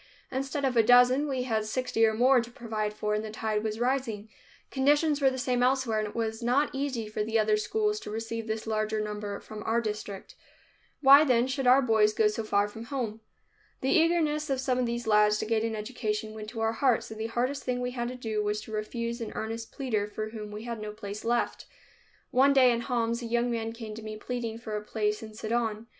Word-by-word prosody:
Instead 270 +2 -2
of 260 -2 0
a 230 - +7
dozen, 245 +5 +5
we 260 -3 -1
had 220 -4 0
sixty 225 +1 -1
or 220 - +1
more 250 +2 +5
to 235 - -8
provide 220 -4 -3
for 210 0 -2
and 210 0 -1
the 220 - -5
tide 215 0 -2
was 215 0 -3
rising. 240 -4 -1 0.4
Conditions 290 +2 +2
were 270 - +5
the 260 - -4
same 250 -1 0
elsewhere 250 -3 +2
and 215 - -1
it 210 - -10
was 225 0 -2
not 255 +5 +2
easy 265 -5 -2
for 210 0 -2
the 225 +1 0
other 215 -1 +3
schools 420 - 0
to - - -8
receive 225 +1 -4
this 220 0 -3
larger 215 0 -1
number 210 -1 -4
from 215 -1 -9
our 225 +2 +1
district. 210 -3 -5 0.7
Why, 280 +1 +9
then, 250 -4 +3
should 260 0 -1
our 260 +2 +6
boys 215 -3 +3
go 215 - +4
so 215 +1 -3
far 205 -1 +2
from 225 +2 -9
home? 230 -5 -4 0.6
The 265 - +1
eagerness 315 -2 +2
of 270 -1 0
some 255 -1 0
of 250 - +1
these 235 0 -3
lads 210 -1 +4
to - - -2
gain 220 0 +1
an 225 -1 -2
education 215 -1 -3
went 215 -1 -7
to 225 -1 -6
our 225 0 +1
hearts, 245 -2 +1
and 220 - -8
the 220 - -2
hardest 250 +5 -1
thing 250 -1 -1
we 250 0 -2
had 240 -1 -3
to 250 - -5
do 220 -4 -2
was 210 0 -1
to 220 - -11
refuse 235 +2 -3
an 225 - -4
earnest 225 +1 -4
pleader 220 -7 -1
for 215 +1 -5
whom 215 -2 -7
we 210 +1 -7
had 235 -2 -5
no 210 0 -5
place 205 0 -7
left. 240 +1 -1 0.6
One 275 +2 +5
day 255 -2 +6
in 235 0 0
Homs 235 -1 -1
a 235 - -4
young 240 +1 +1
man 225 -1 -2
came 225 -2 -7
to 220 - -8
me, 215 0 -6
pleading 230 0 -4
for 220 -2 -6
a 210 - -2
place 210 0 -1
in 215 -1 -9
Sidon. 220 0 -2
230 Hz, 235 wpm, -28 LUFS, 215-255 Hz, 0.7 s, Why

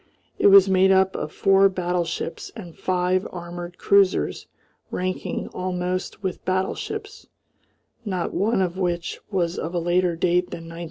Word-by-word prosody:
It - - +5
was 195 -1 +8
made 190 0 +4
up 190 0 +3
of - - -4
four 195 0 +4
battleships 175 -2 -3
and 180 -7 -9
five 185 0 0
armoured 175 0 -7
cruisers 200 -1 +2 0.4
ranking 185 0 -3
almost 185 +1 -3
with 190 -2 -3
battleships, 415 - -3 0.8
not 185 -6 -3
one 200 0 +1
of 180 +1 -3
which 175 -2 -2
was 180 -4 -1
of 170 +2 -4
a - - +2
later 175 +1 +1
date 180 +1 +1
than - - -7
1913. 165 0 -9
185 Hz, 145 wpm, -23 LUFS, 175-190 Hz, 0.8 s, was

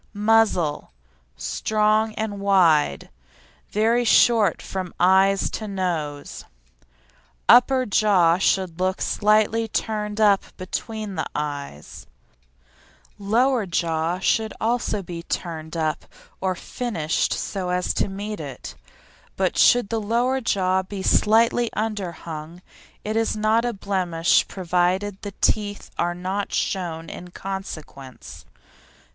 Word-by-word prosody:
MUZZLE 205 - +2 0.5
Strong 215 0 0
and 215 -2 -3
wide; 170 - +2 0.6
very 230 +3 +2
short 230 -2 +4
from 185 -2 -6
eyes 190 +2 +4
to 215 - -5
nose; 170 -7 -4 1.0
upper 255 +1 +6
jaw 190 -5 +3
should 185 -3 0
look 185 0 0
slightly 215 +2 +2
turned 210 -1 -3
up 205 -2 +2
between 215 +2 -5
the - - -3
eyes; 145 - -6 1.1
lower 230 +2 +1
jaw 165 0 -1
should 220 +3 +1
be - - -12
also 225 -3 -1 0.3
turned 160 -1 -4
up 155 -1 -2 0.4
or 185 -1 0
finished 170 -7 -2
so 190 -3 -3
as 180 0 0
to - - 0
meet 205 +2 -5
it, 140 -5 -8 0.6
but 190 -2 0
should 245 -4 +4
the 225 -1 -1
lower 240 +5 0
jaw 190 -4 +1
be 190 +1 -7
slightly 230 +3 +3
underhung 175 -6 -5 0.4
it 215 +1 -3
is 225 -1 0
not 215 +2 +2
a 240 - 0
blemish 185 -5 +1
provided 185 +2 -1
the 205 -1 -7
teeth 205 -1 0
are 175 0 0
not 190 +3 -3
shown 165 -4 -2
in 180 - -9
consequence. 165 -9 -8
195 Hz, 115 wpm, -23 LUFS, 175-215 Hz, 1.1 s, upper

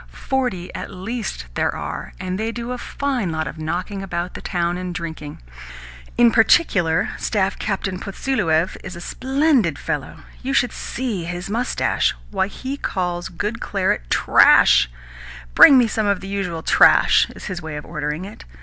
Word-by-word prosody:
Forty 250 -10 -1
at - - -6
least 195 - -5
there - - 0
are, - - -6
and 185 +1 -4
they 225 +1 -1
do 235 +1 -5
a 250 - -4
fine 255 -12 -2
lot 160 0 -2
of 160 - -7
knocking 180 +5 -3
about 175 -2 -4
the - - -8
town 175 -1 -1
and 180 -1 -5
drinking. 160 -4 -6 0.8
In 240 -1 +6
particular, 195 - +3
Staff 195 -3 -1
Captain 190 -2 -2
Potsieluev 190 -6 0
is 185 -1 -7
a - - -8
SPLENDID 265 - +1
fellow! - - -4 0.2
You 270 +2 -3
should 245 -4 +2
just - - -8
see 230 -9 -3
his 175 +3 -5
moustache! 235 - 0 0.2
Why, 190 - 0
he 260 +7 -6
calls 175 -7 -3
good 210 +6 -4
claret 185 - -1
'trash'! 60 - +5 0.6
'Bring 275 - +9
me 245 - +5
some 215 -1 -1
of 200 -2 +1
the 195 - -9
usual 180 -5 -3
trash,' - - +5
is - - -10
his 185 -4 -5
way 160 -1 -6
of 150 - -8
ordering 150 +3 -4
it. 205 - -11
190 Hz, 170 wpm, -21 LUFS, 175-230 Hz, 0.8 s, Bring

